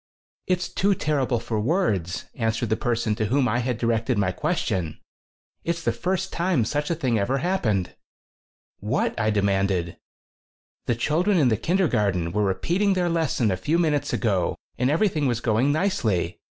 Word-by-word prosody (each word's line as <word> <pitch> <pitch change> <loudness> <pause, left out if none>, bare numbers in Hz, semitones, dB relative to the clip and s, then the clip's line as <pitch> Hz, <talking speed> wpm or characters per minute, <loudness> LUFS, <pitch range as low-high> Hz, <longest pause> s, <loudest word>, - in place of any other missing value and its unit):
"It's 180 -1 0
too 200 +1 +1
terrible 140 -7 0
for 110 -1 -3
words," 105 - 0
an 115 -2 0
swered 115 0 -3
the 110 - +2
person 115 -2 0
to 110 +1 -1
whom 130 +3 +2
I 120 +2 +1
had 125 -1 -1
directed 115 +1 0
my 95 -3 +1
question. 95 - -2 0.6
"It's 170 0 -2
the 120 - +2
first 185 +9 -2
time 170 -9 +1
such 145 +5 -2
a 170 - +1
thing 125 -8 0
ever 125 +7 0
happened." 125 - 0 0.9
"What?" 110 +8 0
I 110 0 +2
demanded. 100 -3 +1
14 85 - -11 0.9
"The 120 - +2
children 170 - +1
in 140 -6 +4
the 110 - +3
kindergarten 105 - +1
were 105 +3 0
repeating 170 - +1
their 180 -2 +1
lesson 160 -10 +1
a - - +1
few 150 - 0
minutes 155 -4 +1
ago 100 -7 0 0.2
and 125 +1 +1
everything 155 -2 +1
was 120 -2 0
going 120 +4 +2
nicely. 125 - 0
120 Hz, 170 wpm, -24 LUFS, 105-165 Hz, 0.9 s, in